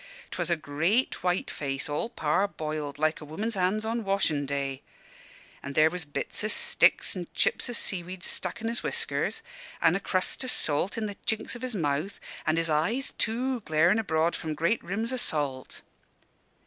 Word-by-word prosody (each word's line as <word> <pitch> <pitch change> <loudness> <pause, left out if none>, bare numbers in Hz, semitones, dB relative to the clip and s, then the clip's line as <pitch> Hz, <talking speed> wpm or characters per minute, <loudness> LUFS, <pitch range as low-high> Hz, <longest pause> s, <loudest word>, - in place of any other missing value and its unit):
'Twas - - -1
a 170 - +4
great 165 - +1
white 180 0 0
face, 140 -2 -3
all 150 +10 -1
parboiled, 155 - -1
like 155 +2 +1
a - - -7
woman's 205 +10 -3
hands 195 +3 +1
on 230 +1 -1
washin' 180 -8 +1
day. 140 -1 -2 0.8
An' 140 - -6
there 155 +2 +5
was 180 -3 -2
bits 145 +7 -2
o' - - +2
sticks 475 - +3
an' 175 -2 -4
chips - - +2
o' - - -3
sea 195 -5 +1
weed 180 +1 -8
stuck 180 +1 -2
in 225 - -2
his 235 +1 -1
whiskers, - - -1 0.4
and 165 +1 +4
a - - +1
crust 185 +4 0
o' - - -3
salt 175 -2 0
i' - - -1
the 205 -2 -3
chinks 220 +2 0
of 240 - -8
his 255 -3 -3
mouth; 155 +2 -1 0.3
an' 155 +1 +3
his 165 0 +1
eyes, 165 - +1
too, 250 +3 +1
glarin' 170 +3 +3
abroad 165 -5 +1
from 155 -2 -3
great 170 +9 +1
rims 220 +7 -2
o' - - 0
salt. 145 - -1
180 Hz, 185 wpm, -28 LUFS, 155-220 Hz, 0.8 s, there